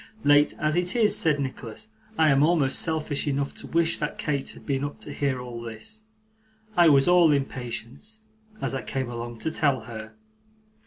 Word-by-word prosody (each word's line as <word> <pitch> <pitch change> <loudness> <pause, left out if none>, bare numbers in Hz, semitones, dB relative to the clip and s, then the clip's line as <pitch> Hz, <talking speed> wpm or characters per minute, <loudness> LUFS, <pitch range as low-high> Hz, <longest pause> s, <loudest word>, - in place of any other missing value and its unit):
'Late 145 0 +4
as 155 +1 0
it 180 +3 0
is,' 215 -3 +4
said 160 -9 +2
Nicholas, 130 - -6 0.3
'I 160 -1 +5
am 135 0 +4
almost 150 -4 +3
selfish 155 -3 0
enough 140 0 -1
to - - -9
wish 165 0 +1
that 150 - -3
Kate 140 -3 -2
had - - -12
been 135 -1 -1
up 145 - -5
to - - -7
hear 140 -3 -1
all 120 -1 -7
this. 120 - -9 0.7
I 175 -2 +6
was 140 0 +5
all 175 -3 +6
impatience, 135 - -4 0.4
as - - -1
I 135 - -2
came 130 -2 -4
along, 120 0 -6
to 160 - -1
tell 140 -6 +1
her. 110 -1 -9
145 Hz, 180 wpm, -26 LUFS, 130-165 Hz, 0.7 s, I